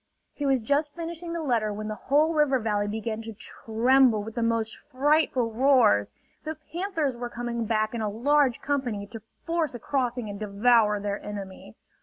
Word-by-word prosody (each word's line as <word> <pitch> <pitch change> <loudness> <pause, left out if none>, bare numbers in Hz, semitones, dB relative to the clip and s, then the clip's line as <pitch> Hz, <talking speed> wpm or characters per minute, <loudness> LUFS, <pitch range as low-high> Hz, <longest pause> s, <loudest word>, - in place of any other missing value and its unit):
He 290 - -3
was 265 -2 +2
just 285 +6 0
finishing 335 0 -6
the 335 -1 -3
letter 230 -6 +1
when 215 +1 -5
the 215 - -3
whole 295 +9 +2
river 295 -4 +3
valley 210 -3 -1
began 220 +1 -3
to 225 0 -8
tremble 235 +1 +2
with 220 +1 -7
the 235 - -2
most 230 -1 0
frightful 270 -3 +1
roars. 225 - +4 0.3
The 315 0 -4 0.2
panthers 330 -7 -1
were 240 0 -5
coming 240 -1 -3
back 215 0 0
in 235 - -3
a 215 - -1
large 265 +4 +2
company 250 -8 -2
to 225 +2 -10 0.2
force 330 -5 -1
a - - -6
crossing 245 -3 -1
and 200 -1 -6
devour 210 0 +3
their 200 0 -4
enemy. 195 - -8
235 Hz, 180 wpm, -26 LUFS, 215-285 Hz, 0.3 s, roars